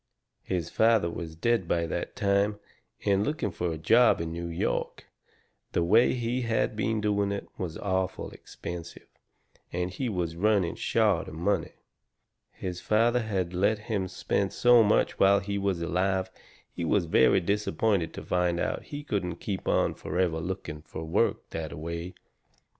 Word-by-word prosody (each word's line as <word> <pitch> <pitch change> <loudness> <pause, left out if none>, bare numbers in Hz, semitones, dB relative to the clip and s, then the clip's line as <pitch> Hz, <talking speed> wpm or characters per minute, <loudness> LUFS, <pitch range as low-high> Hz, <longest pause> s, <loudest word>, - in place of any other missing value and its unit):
His 85 -3 -3
father 110 -6 +3
was 80 -2 -6
dead 110 +2 +1
by 85 0 +1
that 80 - -4
time, 100 +1 +1 0.5
and 100 0 +3
looking 130 -5 -1
fur 85 -1 -2
a - - -5
job 115 +10 +5
in 80 -1 -3
New 85 +1 -4
York, 85 0 -2 0.7
the 85 - +2
way 110 +8 +5
he 120 +1 -1
had 115 -2 0
been 110 +1 0
doing 100 -1 +1
it, 100 - -4
was 85 -3 -4
awful 95 -2 -2
expensive, 85 -1 -8 0.7
and 90 +1 -2
he 120 +7 -3
was 85 -5 -2
running 100 -1 +2
short 105 -6 +1
of - - -8
money. 95 +5 0 0.8
His 90 -1 -6
father 115 +3 +3
had 95 -5 -2
let 100 +4 +2
him 105 -2 -2
spend 95 +1 -1
so 120 -1 +6
much 105 -1 +2
whilst 100 0 +5
he 100 0 -2
was 95 -4 -1
alive 95 +2 0 0.4
he - - -4
was 85 +2 +2
very 80 - +4
disappointed 100 -1 0
to - - -6
find 90 -1 +1
out - - -2
he 145 0 -7
couldn't 95 - -2
keep 95 +2 -5
on - - +2
forever 90 -3 -1
looking 85 -3 -5
fur 80 +1 -8
work 80 - 0
that 80 -2 -4
a - - -7
way. 85 +3 -5
95 Hz, 165 wpm, -28 LUFS, 85-105 Hz, 0.8 s, so